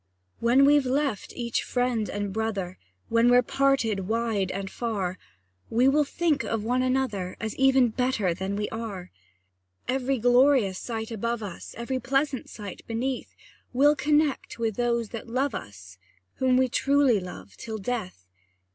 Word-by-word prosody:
When 250 +4 +5
we've 290 -2 +4
left 270 -5 -1
each 235 -2 -1
friend 245 -4 -1
and 205 -1 -3
brother, 205 -4 -3 0.3
When 230 +1 +4
we're 245 0 +6
parted 230 -8 +1
wide 220 -4 0
and 195 +1 -4
far, 190 -4 -3 0.5
We 245 +3 +3
will 295 +2 +4
think 315 0 0
of 225 -2 -2
one 250 +3 +1
another, 255 -8 -1
As 220 -1 -4
even 265 -2 +4
better 225 -6 0
than 190 +3 -3
we 210 0 -1
are. 210 -5 -6 0.8
Every 265 +1 0
glorious 245 -4 +4
sight 225 -1 -5
above 230 +1 -2
us, 190 -4 -8
Every 255 +3 -2
pleasant 270 +1 -1
sight 205 -4 -8
beneath, 245 +3 -3 0.4
We'll 290 +4 +5
connect 295 -3 +1
with 225 -3 -1
those 235 -2 0
that 230 0 -7
love 265 +4 0
us, 95 -2 -9 0.4
Whom 255 -1 +3
we 260 0 +4
truly 275 -2 +3
love 100 - -9
till 220 - -6
death! 195 - -4
235 Hz, 150 wpm, -26 LUFS, 205-260 Hz, 0.8 s, we're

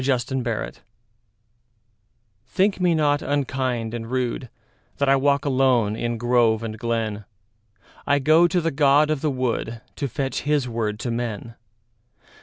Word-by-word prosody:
The 130 0 0
Apology 115 -3 -3 1.7
THINK 195 +8 +1
me 175 -2 +3
not 145 -2 +2
unkind 130 -5 -1
and 115 -1 -5
rudeThat 125 0 -2 0.6
I 135 - +5
walk 140 +1 +2
alone 130 -6 +2
in 120 +1 -2
grove 120 -2 +2
and 110 -1 -5
glen;I 110 +2 -4
go 155 +5 +5
to 180 +1 +1
the 165 -1 -1
god 145 +2 +4
of 150 -3 -1
the 155 - +1
woodTo 130 +1 -3
fetch 135 +2 -2
his 145 -3 0
word 110 -3 -2
to 120 - -2
men. 115 -1 -4
125 Hz, 130 wpm, -23 LUFS, 115-140 Hz, 1.7 s, I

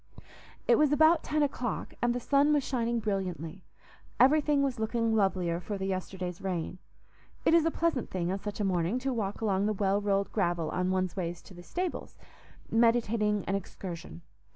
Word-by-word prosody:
It - - +5
was 300 -2 +4
about 315 +2 +5
ten 305 0 +1
o'clock, 255 -5 -3
and 240 0 +2
the - - -1
sun 280 +4 +3
was 290 -2 +2
shining 235 -3 -1
brilliantly; 185 -5 -3 0.6
everything 290 +1 +4
was 260 -4 -1
looking 225 0 0
lovelier 185 -5 +1
for 205 +3 -5
the 190 - -3
yesterday's 185 -2 -4
rain. 180 -1 -3 0.7
It - - +4
is 335 -1 +5
a - - +4
pleasant 325 -7 -1
thing 180 -1 -2
on 195 - -2
such 205 +1 -6
a - - 0
morning 180 +3 +1
to 260 +1 -2
walk 205 -3 -3
along 200 -2 +1
the 215 - +1
well 200 0 +1
rolled 200 -1 0
gravel 175 -5 0
on 180 0 0
one's 185 -1 0
way 175 -3 -2
to 175 +2 -13
the 175 - -11
stables, 355 - -4 0.5
meditating 225 -3 +2
an 195 - -1
excursion. 170 - -6
205 Hz, 180 wpm, -30 LUFS, 185-250 Hz, 0.7 s, It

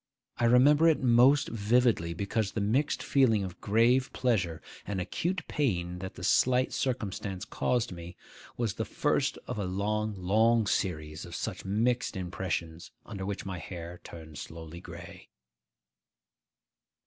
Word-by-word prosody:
I 120 - +1
remember 145 +7 +6
it 160 - +4
most 130 +4 +5
vividly, 110 -6 +2
because 100 +2 -1
the - - -2
mixed 120 +9 +1
feeling 115 -7 +3
of 90 -2 -7
grave 120 +5 +3
pleasure 95 -11 0 0.3
and 100 -2 -2
acute 170 - -2
pain 90 -11 -1
that 95 0 -7
the - - -9
slight 130 0 +3
circumstance 105 -6 -3
caused 120 -3 0
me 85 0 -9 0.4
was 115 -5 -1
the - - -3
first - - 0
of - - -4
a 100 - -1
long, 105 +3 -1
long 110 +5 +3
series 75 -7 -2
of - - -8
such - - -4
mixed 115 +3 0
impressions 85 -2 -4 0.2
under 95 -1 -6
which 100 -1 -4
my 95 -2 -4
hair 85 +1 -8
turned 80 -3 -10
slowly 80 +1 -9
gray. - - -11
105 Hz, 140 wpm, -29 LUFS, 90-120 Hz, 0.4 s, remember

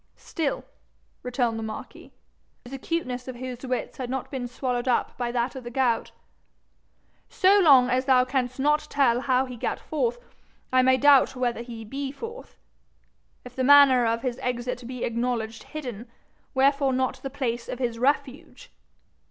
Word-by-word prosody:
'Still,' 310 -4 -3 0.6
returned 245 -2 -1
the - - -5
marquis, 220 0 -8 0.5
the 245 - -11
acuteness 255 -4 -3
of 255 - -6
whose 250 0 -7
wits 255 -1 -3
had 255 -2 -5
not 265 0 -4
been 255 -3 -4
swallowed 245 0 -3
up 250 - 0
by 240 -1 -3
that 240 +2 -1
of 260 - -7
the 240 - -6
gout, 240 -2 0 1.2
'so 390 +2 +4
long 275 -9 +6
as 255 +1 0
thou 255 -2 +4
canst 255 -1 -2
not 300 +2 +2
tell 255 -4 +2
how 260 -1 +2
he 250 -1 -8
gat 230 - -3
forth, - - -2 0.6
I 255 - +6
may 260 0 +4
doubt 275 -1 +5
whether 245 -2 -1
he 230 -2 -8
be 270 +4 -4
forth. 460 - -9 0.9
If 250 0 -11
the 260 - -1
manner 265 -3 +7
of 230 +2 -1
his 250 -1 -3
exit 245 0 -3
be 250 -1 -6
acknowledged 235 -1 -2
hidden, 245 -7 -7 0.5
wherefore 275 0 +3
not 260 0 0
the 270 - -5
place 240 -4 -3
of - - -4
his 235 -2 -2
refuge? 285 - -2
255 Hz, 165 wpm, -25 LUFS, 240-275 Hz, 1.2 s, manner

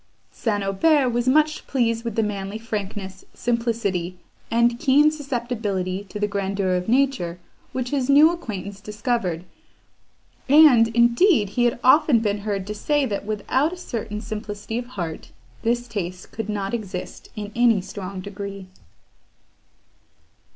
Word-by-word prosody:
St. 205 -4 -1
Aubert 260 +8 +3
was 240 +1 -1
much 305 +3 +2
pleased 230 -3 0
with 230 -3 -4
the 225 - +2
manly 200 0 -3
frankness, 200 -4 -5
simplicity, 225 -7 -1 0.3
and 235 +1 +2
keen 295 +2 +5
susceptibility 230 -10 -3
to 210 +2 -8
the 210 - +1
grandeur 195 -2 -1
of 180 +3 -1
nature, 255 -10 +1 0.3
which 250 -1 -3
his 275 -2 -1
new 295 +4 +7
acquaintance 205 - -6
discovered; 210 -5 -2 1.1
and, 280 -6 +7
indeed, 235 - +3
he 240 +5 +1
had 235 0 +1
often 275 0 +6
been 210 -2 -1
heard 200 -2 -3
to 210 - -4
say, 290 +7 +1
that, 205 -3 -4
without 255 +8 0
a - - -7
certain 215 -9 -5
simplicity 215 +1 -5
of 240 - -7
heart, 175 -10 -6 0.3
this 240 +1 0
taste 185 -5 -5
could 220 -1 -5
not 200 -1 -2
exist 195 -6 -6
in 210 -1 -6
any 235 -3 +4
strong 190 0 -7
degree. 200 0 -7
220 Hz, 140 wpm, -23 LUFS, 200-245 Hz, 1.1 s, new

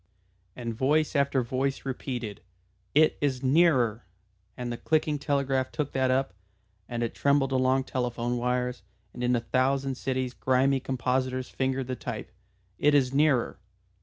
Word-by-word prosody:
_" - - -41 0.5
And 120 -2 -4
voice 150 +7 +1
after 140 -2 +2
voice 135 +3 -2
repeated, 125 -5 -4 0.5
"It 155 +1 +4
is 135 -3 0
nearer," 130 - +3 0.5
and 125 -1 -4
the - - -5
clicking 155 0 0
telegraph 140 -3 0
took 150 -3 -2
that 130 -1 +1
up, 130 -4 +1 0.6
and 120 0 -2
it 115 - -2
trembled 140 -1 +2
along 130 0 +2
telephone 120 -2 -2
wires, 125 +1 -1 0.3
and 125 - -6
in 125 0 +3
a - - +2
thousand 135 +2 0
cities 130 -1 -2
grimy 130 +2 +2
compositors 130 0 -1
fingered 130 0 -1
the 130 +1 -3
type. - - -6 0.5
"It 145 0 +4
is 135 -2 +3
nearer." 140 -7 +2
130 Hz, 150 wpm, -27 LUFS, 125-140 Hz, 0.6 s, It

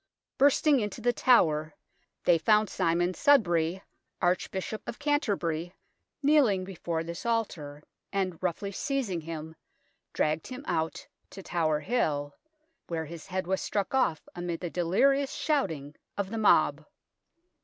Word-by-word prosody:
Bursting 285 +1 +5
into 210 -3 -3
The 245 0 +1
Tower, 155 -12 +3 0.5
they 170 -2 +4
found 215 +5 +3
Simon 175 0 +1
Sudbury, 180 - +3 0.4
Arch 180 +1 +1
bishop 195 +3 -4
of 235 - -5
Canterbury, 195 - -1 0.5
kneeling 270 -10 +4
before 170 -3 -3
this 170 +1 -6
altar, 170 -11 -2 0.3
and, 185 -4 -2
roughly 185 +2 -2
seizing 235 - -2
him, 160 0 -7 0.6
dragged 155 +1 0
him 255 +3 -8
out 160 0 -2 0.2
to 195 - -10
Tower 155 -4 0
Hill, 150 -11 -1 0.5
where 165 -2 -3
his 165 +1 -9
head 185 0 -2
was 190 +1 -1
struck 200 +2 -2
off 255 -12 +1
amid 175 -1 -4
the 175 -2 -4
delirious 270 - +2
shouting 160 - -1 0.2
of 200 -1 -2
the 225 - -2
mob. 215 - +4
185 Hz, 135 wpm, -29 LUFS, 165-230 Hz, 0.6 s, Bursting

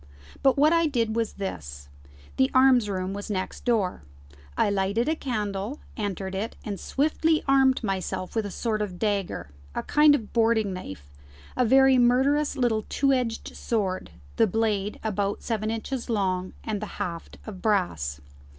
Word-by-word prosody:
But 270 0 +4
what 300 +3 +5
I 335 -1 +3
did 230 -6 0
was 230 -1 -1
this: 70 - -6 0.5
the 130 - +4
arms 255 -4 +5
room 185 -1 -2
was 205 +2 -6
next 190 -2 -4
door: 215 - +1 0.6
I - - +3
lighted 200 +5 0
a 315 - +2
candle, 215 -2 -3 0.2
entered 195 -3 -3
it, 200 +4 -3
and 200 -4 -4
swiftly 310 +2 +1
armed 270 -2 +4
myself 190 -1 -3
with 220 -2 0
a - - -6
sort 215 +2 -2
of 190 -4 -4
dagger, 200 - -2 0.2
a - - -2
kind 300 0 +5
of 225 -7 -5
boarding 225 -3 +2
knife, 85 - -9 0.4
a 250 - +2
very 265 +2 +6
murderous 275 +5 +3
little 230 -4 +1
two 275 -1 +2
edged 245 -3 -2
sword, 195 -5 -2 0.3
the 225 -2 +5
blade 210 -1 -1
about 205 -2 -1
seven 215 -2 -1
inches 235 +3 -4
long, 185 -4 -1
and 215 -2 -3
the 215 - -4
haft 170 -2 -5
of 195 -4 -8
brass. 85 - 0
215 Hz, 160 wpm, -26 LUFS, 195-250 Hz, 0.6 s, very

